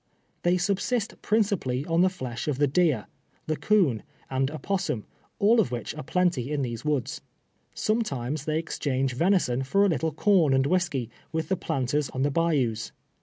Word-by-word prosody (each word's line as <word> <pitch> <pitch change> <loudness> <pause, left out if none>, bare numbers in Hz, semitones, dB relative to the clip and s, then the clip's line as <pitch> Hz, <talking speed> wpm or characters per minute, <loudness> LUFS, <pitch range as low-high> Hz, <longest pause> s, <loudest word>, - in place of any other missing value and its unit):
They 175 +1 +3
subsist 200 +5 -1
princi 210 -3 +2
pally 130 +2 -2
on 165 +1 +2
the 185 - +5
flesh 130 -10 -6
of 145 -4 0
the 145 - +4
deer, 145 -5 +2 0.4
the 155 - -1
coon, 165 - +2 0.3
gend 135 0 +1
opos 185 +5 -2
sum, 120 - -3 0.3
all 220 +2 +5
ot' - - -1
which 120 -1 -4
are 155 - -6
plenty 160 -5 0
in 145 -2 0
these 120 -2 -4
woods. 150 -5 -1 0.5
Some 220 +2 +1
times 140 - -3
they 155 0 0
exchange 135 -5 -1
venison 165 -4 +2
for 195 +10 +3
a - - +3
little 160 -1 0
corn 160 -3 +3
and 135 0 +3
whisky 145 -8 0 0.2
with 160 0 -2
the 190 - +2
planters 140 -2 -1
on 130 - -2
the 145 - +2
bayous. 135 -9 0
150 Hz, 180 wpm, -27 LUFS, 130-180 Hz, 0.5 s, the